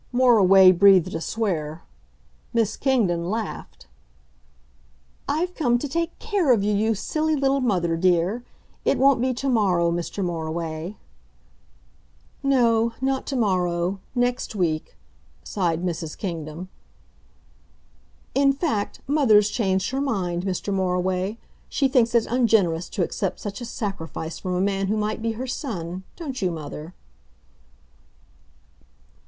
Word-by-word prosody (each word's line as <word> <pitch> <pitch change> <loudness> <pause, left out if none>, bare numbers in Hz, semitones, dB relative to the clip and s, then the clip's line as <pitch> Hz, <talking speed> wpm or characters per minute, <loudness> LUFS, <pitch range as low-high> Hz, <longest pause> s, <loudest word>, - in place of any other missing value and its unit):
Moriway 200 -7 +6
breathed 185 -1 +5
a 165 - -3
swear. 165 -8 -2 0.7
Miss 225 -2 +1
Kingdon 185 -11 +1
laughed. 215 - -5 1.4
"I've 355 +4 0
come 245 -8 +2
to 290 - -4
take 335 +4 -2
care 400 -10 +1
of 220 -5 +3
you, 210 +1 +1
you 220 +2 +1
silly 310 +9 -1
little 275 -1 +1
mother, 180 -9 +1
dear.... 180 +6 +1 0.4
It - - +2
won't 270 -2 +4
be 260 +1 +1
to 275 - -3
morrow, 185 -9 +2
Mr. 175 +3 -3
Moriway." 165 +1 -4 1.5
"No 235 -4 +3
not 265 0 -1
to 275 - -2
morrow 185 -4 0 0.2
next 245 -2 -1
week," 165 -5 -1 0.5
sighed 175 -4 -1
Mrs. 165 -3 -4
Kingdon. 165 -2 -5 1.7
"In 275 0 +4
fact, 275 - -2
mother's 230 -8 +4
changed 190 -3 0
her 270 +1 -1
mind, 185 -9 -1
Mr. 195 +1 -2
Moriway. 185 +2 0 0.3
She 275 - +2
thinks 240 -3 +2
it 230 - +4
ungenerous 215 -9 +2
to 185 - -1
accept 190 +2 -3
such 205 +2 -6
a - - -4
sacrifice 170 - -5
from 185 -1 -3
a 180 - 0
man 195 0 0
who 215 +2 0
might 215 +1 -2
be 225 0 -1
her 245 +4 -5
son 185 - -4
don't 275 -8 -6
you, 185 - +1
mother?" 155 +1 -7
200 Hz, 130 wpm, -24 LUFS, 175-245 Hz, 1.7 s, Moriway